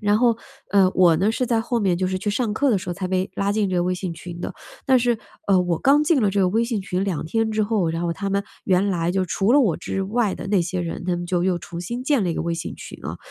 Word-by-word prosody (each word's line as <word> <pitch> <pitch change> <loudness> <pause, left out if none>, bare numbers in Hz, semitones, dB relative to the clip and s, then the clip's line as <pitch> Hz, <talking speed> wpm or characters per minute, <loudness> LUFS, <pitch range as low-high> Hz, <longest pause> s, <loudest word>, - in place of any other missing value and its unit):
然 210 0 +2
后， 235 -2 +3 0.4
呃， 195 -2 +5
我 175 -3 +6
呢， 200 +4 +2
是 250 +3 -1
在 230 -1 +1
后 235 +1 -1
面 190 -5 +1
就 185 +1 0
是 185 0 -2
去 205 - -3
上 215 +1 -1
课 280 +6 +1
的 205 - +3
时 - - -8
候 175 - -1
才 185 +1 -3
被 185 +1 -1
拉 200 0 0
进 205 -2 0
这 180 - 0
个 175 - +2
微 180 - 0
信 180 -1 -4
群 170 +1 -9
的， - - -4 0.3
但 260 -2 +5
是， 240 -1 +1 0.3
呃， 195 -2 +4
我 175 -2 0
刚 285 +2 +4
进 300 -3 +3
了 205 - +2
这 200 0 +1
个 185 - +3
微 225 +5 +1
信 230 -3 -2
群 185 0 -2
2 185 -6 -2
天 225 +7 0
之 215 0 +1
后， 205 -5 +1
然 165 +1 -3
后 170 -1 0
他 200 +4 -4
们 200 0 0 0.2
原 190 0 +3
来 175 -2 0
就 190 -1 +1
除 195 +5 +1
了 290 - +6
我 200 - +2
之 195 - -3
外 210 +1 0
的 195 - -7
那 200 -2 +3
些 180 +1 -2
人， 170 0 -4
他 180 - 0
们 175 - -4
就 175 0 0
又 185 -2 +2
重 170 +1 -7
新 235 +8 -4
建 265 -5 +2
了 175 - 0
一 165 - -2
个 - - -2
微 170 - -1
信 165 - -5
群 - - -10
了， - - -5
195 Hz, 325 characters per minute, -23 LUFS, 180-220 Hz, 0.4 s, 我